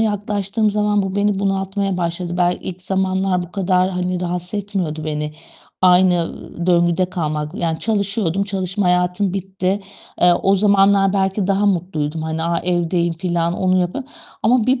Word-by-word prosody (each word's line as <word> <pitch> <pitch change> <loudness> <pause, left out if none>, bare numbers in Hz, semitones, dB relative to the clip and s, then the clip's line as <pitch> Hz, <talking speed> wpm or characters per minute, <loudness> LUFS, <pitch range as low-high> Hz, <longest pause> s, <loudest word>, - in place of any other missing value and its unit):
yaklaştığım 210 0 0
zaman 210 0 +1
bu 190 0 -3
beni 205 -1 +1
bunaltmaya 195 0 -1
başladı. 170 0 -2
Bel 175 0 +2
ilk 180 0 -7
zamanlar 190 -1 0
bu 175 0 -10
kadar, 185 -1 +2
hani, 180 0 -2
rahatsız 180 +1 -3
etmiyordu 190 -7 -3
beni 150 -1 -3 0.5
aynı, 180 0 +5
ııı, 170 +1 -7
döngüde 175 0 +3
kalmak. 155 -3 -3
Yani 165 -5 -2
çalışıyordum, 200 -3 0
çalışma 195 0 -2
hayatım 180 +2 +1
bitti. 190 0 -2 0.4
Eee, 175 0 +6
o 195 - +4
zamanlar 195 -1 +4
belki 195 0 0
daha 200 +1 +2
mutluydum. 165 -5 -1
Hani, 160 0 -3
a 170 0 0
evdeyim 175 -1 0
filan 170 0 -1
onu 185 0 +2
yapıyorum 255 +11 -3 0.3
ama 235 -1 +3
bir 255 0 +2
185 Hz, 155 wpm, -19 LUFS, 175-200 Hz, 0.5 s, Eee